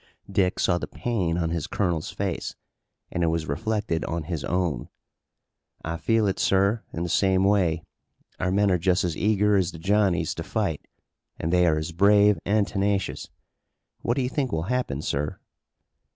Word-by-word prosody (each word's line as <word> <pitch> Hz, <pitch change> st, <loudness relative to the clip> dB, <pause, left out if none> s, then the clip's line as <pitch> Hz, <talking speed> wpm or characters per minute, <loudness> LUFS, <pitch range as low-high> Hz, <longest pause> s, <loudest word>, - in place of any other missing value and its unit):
Dick 90 Hz, -1 st, +1 dB
saw 90 Hz, -1 st, +2 dB
the -, -, -5 dB
pain 95 Hz, -9 st, -1 dB
on 85 Hz, -2 st, -1 dB
his 85 Hz, -3 st, -2 dB
colonel's 85 Hz, -6 st, -1 dB
face -, -, -3 dB, 0.6 s
and 85 Hz, -, -1 dB
it -, -, +3 dB
was 80 Hz, -1 st, -1 dB
reflected 105 Hz, +1 st, -1 dB
on 85 Hz, -1 st, -3 dB
his 80 Hz, -3 st, -4 dB
own. 85 Hz, -9 st, -1 dB, 1.0 s
"I 85 Hz, +1 st, -3 dB
feel 115 Hz, +5 st, +2 dB
it, 95 Hz, -, 0 dB
sir, 100 Hz, +3 st, +2 dB
in 85 Hz, -, -3 dB
the -, -, -2 dB
same 95 Hz, +2 st, +2 dB
way. 90 Hz, -5 st, +2 dB, 0.6 s
Our 95 Hz, -, 0 dB
men 100 Hz, +1 st, +3 dB
are 90 Hz, -, +2 dB
just 90 Hz, +1 st, +2 dB
as 85 Hz, -3 st, -1 dB
eager 105 Hz, +2 st, +2 dB
as 90 Hz, -2 st, +1 dB
the -, -, -8 dB
Johnnies 95 Hz, +1 st, +1 dB
to -, -, -5 dB
fight -, -, -2 dB, 0.5 s
and 80 Hz, +2 st, -2 dB
they 90 Hz, -1 st, +4 dB
are 80 Hz, -2 st, +3 dB
as 80 Hz, +2 st, -3 dB
brave 100 Hz, +3 st, +5 dB
and 105 Hz, -1 st, +2 dB
tenacious. 100 Hz, -1 st, -1 dB, 0.7 s
What 120 Hz, -, 0 dB
do 135 Hz, -, +1 dB
you 125 Hz, -, -1 dB
think 135 Hz, -2 st, -1 dB
will 80 Hz, -, -1 dB
happen, 75 Hz, -, -2 dB
sir?" 75 Hz, +1 st, -2 dB
95 Hz, 180 wpm, -25 LUFS, 85-105 Hz, 1.0 s, brave